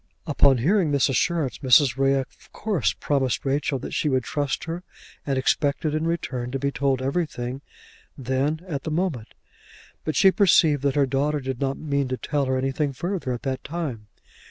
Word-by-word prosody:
Upon 140 -3 +4
hearing 170 - +2
this 140 -1 +2
assurance, 155 0 0
Mrs. 130 -1 +5
Ray 135 0 +3
of 135 -1 -6
course 205 - 0
promised 135 -3 -1
Rachel 140 0 0
that - - -7
she 150 - 0
would 130 -2 +1
trust 145 -1 -2
her 165 +2 -4 0.5
and 135 -1 0
expected 145 +3 +1
in 155 +1 0
return 130 -7 -2
to 135 - -2
be 140 +1 -1
told 135 -2 0
everything 135 -3 -2 0.6
then, 135 +4 -1
at 145 -6 -3
the - - -5
moment. 155 -8 -2 0.7
But 155 - -2
she 190 - +6
perceived 165 -7 +4
that 140 -1 0
her 145 -1 +4
daughter 145 +3 0
did 130 -1 -5
not 135 0 -1
mean 140 -3 -1
to 130 0 -3
tell 145 +1 -1
her 130 0 0
anything 135 +2 -1
further 175 -1 -3
at 120 - -4
that 130 -1 -3
time. 140 -10 -5
140 Hz, 180 wpm, -24 LUFS, 130-155 Hz, 0.7 s, she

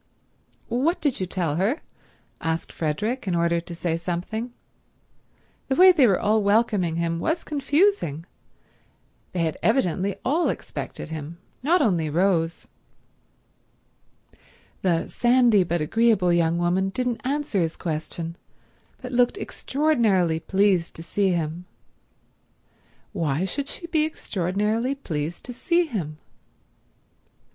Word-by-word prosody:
"What 270 +9 +1
did 290 -5 0
you 185 - -2
tell 170 -5 -1
her?" 205 - +1 0.6
asked 165 0 -2
Frederick, 210 - -2
in 180 - +1
order 170 0 +1
to 170 0 -9
say 165 -1 -1
something. 180 +8 -4 1.2
The 265 - 0
way 370 +3 +8
they 285 -8 +5
were 195 - +3
all 215 +1 +2
welcoming 200 -5 +2
him 165 0 -1
was 320 - -1
confusing. 290 - +1 1.1
They 180 - -2
had 160 -1 -2
evidently 195 -5 +1
all 320 +6 +2
expected - - -5
him, 160 +1 -6 0.2
not 315 +4 +3
only 170 - +1
Rose. 170 0 +1 2.1
The 170 -3 +1
sandy 240 -5 +4
but 170 -1 -1
agreeable 205 +1 +3
young 170 -1 +2
woman 180 +3 +1
didn't 245 +1 -2
answer 280 -7 -1
his 165 -1 -2
question, 165 +1 -4 0.7
but 250 - -6
looked 245 +7 +2
extraordinarily 230 - +1
pleased 190 -1 +1
to 165 - -8
see 195 +3 +1
him. 170 0 -2 1.5
Why 155 +2 0
should 280 +9 -3
she 340 - -6
be 320 -3 +1
extraordinarily 210 - -1
pleased 160 - -4
to 250 - -6
see 345 +7 +1
him? 175 - -4
190 Hz, 120 wpm, -24 LUFS, 170-250 Hz, 2.1 s, way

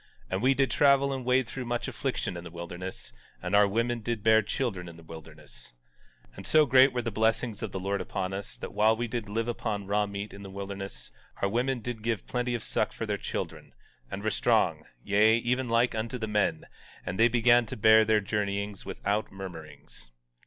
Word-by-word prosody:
And 95 +1 -1
we 135 +2 +4
did 135 0 +2
travel 140 -1 +4
and 130 -1 -4
wade 125 0 +2
through 125 +2 -6
much 120 0 -2
affliction - - -3
in 85 - -7
the 85 - -8
wilderness; 85 -3 -7 0.3
and - - -1
our 100 0 +6
women 115 +4 0
did 115 -1 -3
bear 110 0 +6
children 100 -5 -3
in 85 - -12
the 85 - -14
wilderness. 80 -5 -12 0.6
17:2 - - -23
And - - -7
so 155 -1 +5
great 130 0 +6
were 125 -1 -2
the 115 - -2
blessings 110 +1 0
of 110 -4 -4
the 95 - -4
Lord 100 +2 -1
upon 95 0 -3
us, 100 0 -6
that - - -7
while 110 +2 +4
we 120 +1 -2
did 115 -2 -4
live 115 +2 -1
upon 110 -4 -3
raw 105 +1 +1
meat 100 0 -6
in 100 - -10
the 100 - -8
wilderness, 100 0 -7 0.3
our - - +4
women 125 +3 0
did 120 -1 -5
give 115 -3 -2
plenty 125 0 -1
of 115 - -4
suck - - 0
for - - -4
their - - -1
children, - - -5 0.3
and 100 - -6
were 110 - +1
strong, - - +2 0.2
yea, 105 +3 +4
even 125 +1 -1
like 115 +1 +3
unto 115 +3 -3
the 110 -2 -3
men; 105 -1 0 0.4
and 90 +1 -4
they 115 - +7
began 120 0 +4
to - - -6
bear 110 +1 +7
their 110 -1 +3
journeyings 100 0 -2
without 105 +2 -2
murmurings. 80 -9 -10
110 Hz, 210 wpm, -28 LUFS, 100-120 Hz, 0.6 s, they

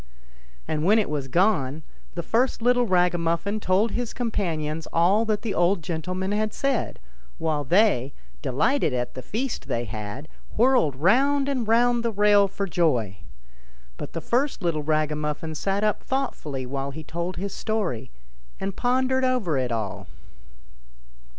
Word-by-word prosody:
And 155 -1 -1
when 205 +6 +5
it 215 -8 +1
was 145 -3 -2
gone, 160 -3 +1 0.3
the 170 - -3
first 235 +4 +1
little 245 0 +3
ragamuffin 180 +2 +1
told 200 +3 +2
his 245 -1 -3
com 240 -2 -2
panions 160 -5 -2
all 190 +7 +3
that 215 -1 -1
the 220 -4 -2
old 175 0 +2
gentleman 180 +4 -3
had 215 +1 -1
said; 275 -4 -1 0.4
while 155 -2 -1
they, 160 - +3 0.3
delighted 155 - +1
at 125 -1 -2
the 130 - -6
feast 230 - -4
they 120 +1 -1
had, 110 +6 -6 0.3
whirled 240 - +4
round 270 - +3
and 255 -5 -1
round 240 +1 +3
the 235 - +1
rail 205 -1 +4
for 200 +1 -3
joy. 125 - +1 0.8
But - - -7
the 165 - -4
first 250 - 0
little 165 -3 0
raga 155 0 0
muffin 150 +1 -3
sat 195 +6 -1
up 210 -1 +1
thoughtfully 155 - -3
while 135 +2 -3
he 155 +3 -7
told 170 +4 -4
his 195 +3 -4
story, 175 - -2 0.5
and 195 0 -3
pondered 260 +1 +1
over 250 - +1
it 130 -2 0
all. 100 -4 -3
180 Hz, 155 wpm, -25 LUFS, 150-225 Hz, 0.8 s, when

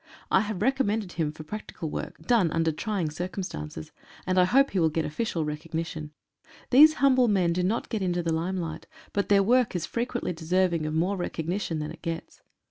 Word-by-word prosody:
I - - +6
have 210 -2 -3
recommended 225 -7 +1
him 160 -4 -1
for 155 +1 -10
practical 165 -3 -6
work, - - -5
done 225 -9 +3
under 165 0 +1
trying 175 -1 -2
circumstances, 155 - -5 0.3
and 185 0 +2
I 180 - +6
hope 275 +8 +4
he 190 - 0
will 160 -2 +4
get 160 +1 -1
official 165 0 -2
recognition. 160 0 -4 0.6
These 305 +5 +8
humble 260 -3 +4
men 185 -5 +2
do 180 - 0
not 200 +6 0
get 220 -4 -3
into 175 -2 0
the 165 -1 0
limelight, 165 -1 -3 0.3
but 200 - -1
their 200 -1 +5
work 245 0 +3
is 175 - -1
frequently 240 -4 -2
deserving 170 -1 +1
of 155 - -3
more 180 +5 +1
recognition 175 0 -2
than 150 0 -4
it - - -12
gets. 165 0 -5
180 Hz, 190 wpm, -27 LUFS, 160-210 Hz, 0.6 s, These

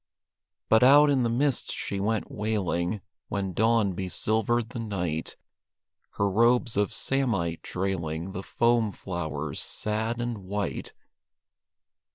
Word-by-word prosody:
But 110 - +5
out 145 +3 +7
in 135 -2 +3
the 120 - +1
mist 130 +3 0
she 100 - -3
went 110 +2 -1
wailing 100 -2 -1 0.3
When 95 -2 -2
dawn 110 -1 +3
besilvered 110 +5 0
the 125 - -6
night, 90 -8 -3 0.8
Her 100 - +1
robes 115 +3 +3
of 105 0 +1
samite 110 -12 0
trailing 90 -2 -3
The 95 - -5
foam 115 +1 +2
flowers, 80 -7 -4
sad 110 +2 -2
and 120 -2 -2
white. 100 +2 -4
105 Hz, 120 wpm, -27 LUFS, 95-115 Hz, 0.8 s, out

